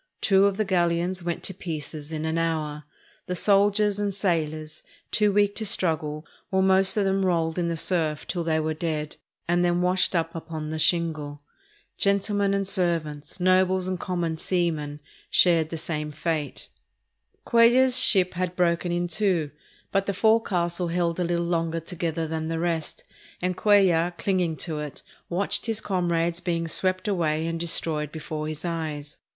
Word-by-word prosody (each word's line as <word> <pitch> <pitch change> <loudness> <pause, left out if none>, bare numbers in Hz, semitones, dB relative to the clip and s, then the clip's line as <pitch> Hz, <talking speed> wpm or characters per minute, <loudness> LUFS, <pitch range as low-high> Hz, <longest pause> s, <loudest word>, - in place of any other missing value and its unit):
Two 195 -1 +4
of 195 -1 -1
the 215 - +1
galleons 175 0 0
went 170 -1 -3
to 190 - -1
pieces 155 -4 -6
in 155 0 -3
an 160 +1 0
hour. 155 -3 -2 0.4
The 180 - -2
soldiers 205 +1 +3
and 200 -2 -1
sailors, 155 -5 -2 0.3
too 210 -1 +3
weak 205 0 +3
to 220 - -2
struggle, 155 -5 0 0.2
were 190 0 +2
most 190 +1 +3
of 205 - +2
them 195 0 +1
rolled 165 -2 0
in 170 - 0
the 170 -1 -2
surf 155 -3 0
till 175 -2 -3
they 160 -1 +1
were 155 0 -1
dead, 155 -2 -3 0.3
and 175 +1 +2
then 175 0 +1
washed 180 +1 +2
up 165 -1 0
upon 160 -2 -6
the 160 - -3
shingle. 155 -4 0 0.6
Gentlemen 200 0 +1
and 195 -1 -1
servants, 165 -5 -2
nobles 185 0 +3
and 185 -1 -2
common 170 -3 -2
seamen, 155 -6 -1 0.3
shared 165 -3 +4
the 165 - -4
same 150 -2 -3
fate. 155 -1 -3 0.8
Cuellar's 250 +2 +5
ship 185 -7 +5
had 180 0 -2
broken 175 -1 +1
in 175 0 0
two, 175 -4 0 0.4
but 195 0 0
the 200 - -1
forecastle 180 -5 +1
held 170 0 -1
a - - +1
little 170 0 0
longer 165 -1 -1
together 165 -1 -3
than 160 0 -3
the 165 0 -2
rest, 165 -2 -2 0.4
and 180 0 -1
Cuellar, 180 -4 +3
clinging 180 -5 0
to 155 -1 -3
it, 150 -2 -7 0.3
watched 190 +6 0
his 225 -1 0
comrades 175 -3 0
being 170 -2 -1
swept 185 +4 0
away 160 -5 0
and 165 0 -3
destroyed 160 -3 0
before 155 -1 -5
his 155 +2 -5
eyes. 155 -4 -4
170 Hz, 165 wpm, -25 LUFS, 160-185 Hz, 0.8 s, Cuellar's